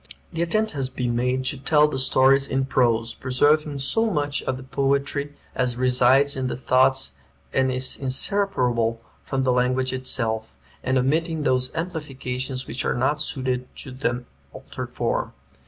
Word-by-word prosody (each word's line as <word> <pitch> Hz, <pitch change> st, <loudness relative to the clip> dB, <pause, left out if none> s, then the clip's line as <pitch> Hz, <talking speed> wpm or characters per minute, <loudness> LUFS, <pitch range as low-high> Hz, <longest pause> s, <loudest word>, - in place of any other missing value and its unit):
The 165 Hz, -, -2 dB
attempt 215 Hz, +6 st, +1 dB
has 135 Hz, -3 st, -3 dB
been 125 Hz, -2 st, -2 dB
made 125 Hz, +2 st, 0 dB
to 135 Hz, +1 st, 0 dB
tell 150 Hz, +2 st, +4 dB
the 135 Hz, -3 st, -3 dB
stories 135 Hz, +1 st, +4 dB
in 135 Hz, 0 st, 0 dB
prose, 115 Hz, -3 st, +1 dB
preserving 145 Hz, +3 st, +1 dB
so 225 Hz, +12 st, +1 dB
much 145 Hz, -6 st, -1 dB
of 130 Hz, -, -2 dB
the 130 Hz, -, -9 dB
poetry 140 Hz, +2 st, -1 dB, 0.2 s
as 125 Hz, -1 st, 0 dB
resides 130 Hz, +2 st, +4 dB
in 130 Hz, -1 st, -2 dB
the -, -, -3 dB
thoughts 130 Hz, -, +2 dB, 0.4 s
and 130 Hz, 0 st, +2 dB
is 130 Hz, 0 st, 0 dB
separable 125 Hz, -, +1 dB, 0.2 s
from 135 Hz, -1 st, -2 dB
the 130 Hz, -, +2 dB
language 130 Hz, +1 st, +1 dB
itself, 115 Hz, -4 st, -1 dB, 0.3 s
and 130 Hz, 0 st, +1 dB
omitting 155 Hz, +4 st, 0 dB
those 130 Hz, -2 st, +1 dB
amplifications 135 Hz, -6 st, -4 dB
which 130 Hz, -, -4 dB
are -, -, 0 dB
not 145 Hz, +5 st, 0 dB
suited 130 Hz, -3 st, -2 dB
to 135 Hz, -, -5 dB
the 125 Hz, -1 st, -2 dB, 0.3 s
altered -, -, -7 dB
form. -, -, -2 dB
130 Hz, 155 wpm, -24 LUFS, 125-145 Hz, 0.4 s, tell